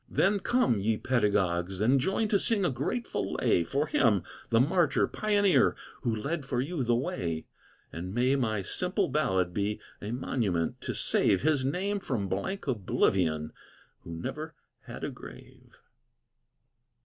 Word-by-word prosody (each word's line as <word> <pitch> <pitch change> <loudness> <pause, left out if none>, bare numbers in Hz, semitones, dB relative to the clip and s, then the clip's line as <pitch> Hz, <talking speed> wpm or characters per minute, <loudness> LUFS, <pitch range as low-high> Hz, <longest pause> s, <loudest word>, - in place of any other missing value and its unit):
Then 200 +1 +2
come, 190 - +2
ye 110 +2 +1
pedagogues, 95 -7 0
and 125 +6 +4
join 195 - 0
To 200 - +3
sing 210 -4 +2
a 175 - +2
grateful 155 - -2
lay 85 - +2
For 140 - 0
him, 110 - +2 0.3
the 115 - +4
martyr 160 +3 +3
pioneer, 205 -3 +3 0.3
Who 120 -4 0
led 145 +8 -3
for 130 -2 -2
you 145 +2 -1
the 120 0 +2
way. 85 -10 -2 0.5
And 90 +3 -5
may 125 +5 +2
my 110 -7 0
simple 180 - -1
ballad 95 -12 +1
be 105 +2 -1 0.2
A 105 - -5
monument 110 -9 -1
to - - -4
save 95 - +2
His 150 -3 +2
name 190 +8 -1
from 120 - -2
blank 100 - -3
oblivion, 90 - +1 0.5
Who 85 - -8
never 80 - -5 0.3
had - - -8
a - - -2
grave. - - -13
125 Hz, 150 wpm, -29 LUFS, 100-160 Hz, 0.5 s, and